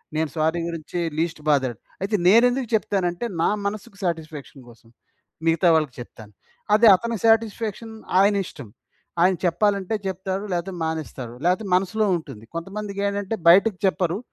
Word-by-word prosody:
నేను 160 0 0
సారీ 160 +2 +1
గురించి 170 +1 -5 0.2
లీస్ట్ 165 -1 -2
బాదాడు. 130 -5 +1 0.2
అయితే 200 +3 0
నేనెందుకు 245 +5 +4
చెప్తానంటే, 190 -2 0 0.2
నా - - +3 0.2
మనసుకి 200 -1 -5
సాటిస్‌ఫాక్షన్ 155 -5 -5
కోసం. 115 0 -19 0.6
మిగతా 165 +2 +3
వాళ్ళకి 155 -5 0
చెప్తాను. 110 -3 -11 0.4
అదే 225 +2 +6
అతని 230 +3 -3
సాటిస్‌ఫాక్షన్ 225 0 +1 0.3
ఆయనిష్టం. 195 - 0 0.5
ఆయన 185 +1 +4
చెప్పాలంటే 200 +3 +1
చెప్తాడు, 190 +1 -3
లేకపోతే 175 +2 -3
మానేస్తాడు. 155 -7 -5
లేకపోతే 185 +5 +1
మనసులో 195 +4 +1
ఉంటుంది. 115 -9 -11
కొంతమందికి 200 +3 -5
ఏంటంటే 200 +2 -2
బయటకి 195 +2 +5
చెప్పరు. 185 -2 +1
185 Hz, 130 wpm, -23 LUFS, 160-205 Hz, 0.6 s, అదే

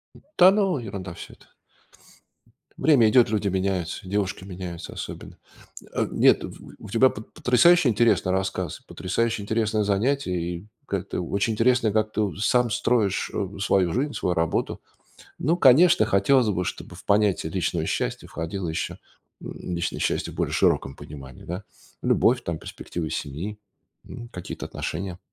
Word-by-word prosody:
М, - - -16 0.2
да, 185 +1 +8
ну, 195 -5 +1
ерунда 100 -6 -6
всё - - -10
это. - - -21 1.3
Время 135 -8 +5
идет, 120 0 +5
люди 105 -2 0
меняются, 95 -2 -2
и 95 - -9
девушки 100 -2 -1
меняются 90 -3 -7
особенно. - - -8 0.4
М - - -18
а - - 0
нет, - - +4
в - - -10
в - - -12
у - - -9
тебя 120 +5 +5
пот 110 - -10
потрясающе 140 +5 +5
интересный 105 -5 +2
рассказ, 95 -3 -2
потрясающе 110 +3 -1
интересное 110 0 0
занятие 105 -1 0
и 85 +3 -4 0.2
как-то 100 -2 -3
очень 100 +5 -1
интересно, 115 0 +3
как 110 0 0
ты 110 - 0
у 100 - -1
сам 120 +3 +2
строишь, 105 -3 +1
э, 100 0 -3
свою 95 -3 +2
жизнь, 140 +4 -1
свою 90 - -1
работу. 85 -1 -1 0.6
Ну, 165 +5 +1
конечно, 170 +6 +6
хотелось 125 +5 +3
бы, 90 -3 0
чтобы 90 - -6
в 95 - -13
понятие 105 -2 +2
личного - - -1
счастья - - -2
входило 85 +2 -4
еще, 80 - -3 0.4
м, 90 - -6
личное 85 0 -2
счастье - - -1
в - - -13
более - - -1
широком 70 - +2
понимании, 70 -4 -11
да? 90 +4 -6 0.4
Любовь, - - +3
там, - - -3
перспективы 80 -3 -6
семьи, 85 +10 -4 0.5
м, 120 0 -9
какие-то 90 -6 -7
отношения. 90 +2 -5
100 Hz, 160 wpm, -25 LUFS, 90-120 Hz, 1.3 s, да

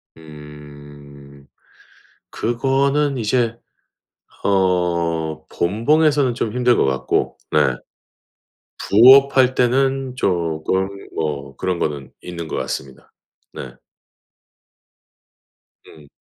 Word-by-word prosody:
그 75 -2 -14 0.8
그거는 135 +4 0
이제 115 0 0 0.9
어 85 -5 0
본봉에서는 140 - +1
좀 110 -4 -3
힘들 125 0 +2
것 - - +2
같고 65 -1 -1
네 65 - +2 1.1
부업할 130 +3 +6
때는 130 +1 +1
쪼금 90 -2 -1 0.3
뭐 70 -3 -4
그런 90 -2 -2
거는 70 -3 -4
있는 85 -2 -7
것 - - -5
같습니다. 65 -1 -6 0.4
네. 65 -3 -8 2.1
음. 75 -2 -16
90 Hz, 150 characters per minute, -20 LUFS, -, 2.1 s, 부업할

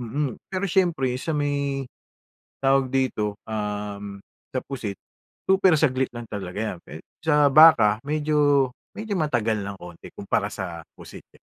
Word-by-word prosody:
mm, 130 +3 -2 0.2
pero 190 +1 -2
siyempre 165 -9 +1
sa 160 - -3
may, 140 -2 -1 0.8
tawag 135 -1 +3
dito, 105 -6 -1
um, 105 -2 -4 0.3
sa 130 - -1
pusit, 115 -8 -5 0.5
super 190 -2 +5
saglit 130 -4 +1
lang 120 0 -7
talaga 100 -2 -6 0.2
'yan - - -13
pe 80 - -10 0.2
sa 150 -2 +4
baka 120 -10 +7
medyo 145 -3 +2 0.3
medyo 215 -1 -5
matagal 115 -8 0
ng 100 0 -6
konti 85 -1 -11
kumpara - - -1
sa 85 -3 -6
pusit, - - -12
eh. - - -30
130 Hz, 140 wpm, -24 LUFS, 105-150 Hz, 0.8 s, baka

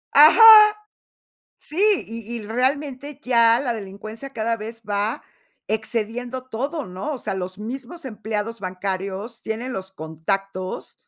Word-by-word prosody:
¡Ajá! 305 +9 +8 1.2
Sí, 315 - -7 0.3
y 230 +1 -7
y - - -8
realmente, 275 +4 -2
ya 235 -2 +5
la 250 -4 -1
delincuencia, 215 +5 -8
cada 230 0 -1
vez 225 +1 -8
va 205 +2 -1 0.5
excediendo 230 +3 -3
todo, 265 +5 -4
¿no?, 185 +9 -5
o 285 - -3
sea, 215 - -4
los 185 0 -5
mismos 265 +9 -7
empleados 220 -1 -4
bancarios 195 +4 -4
tienen 230 +4 -4
los 190 -1 -6
contactos. 185 +3 -4
225 Hz, 125 wpm, -22 LUFS, 200-255 Hz, 1.2 s, Ajá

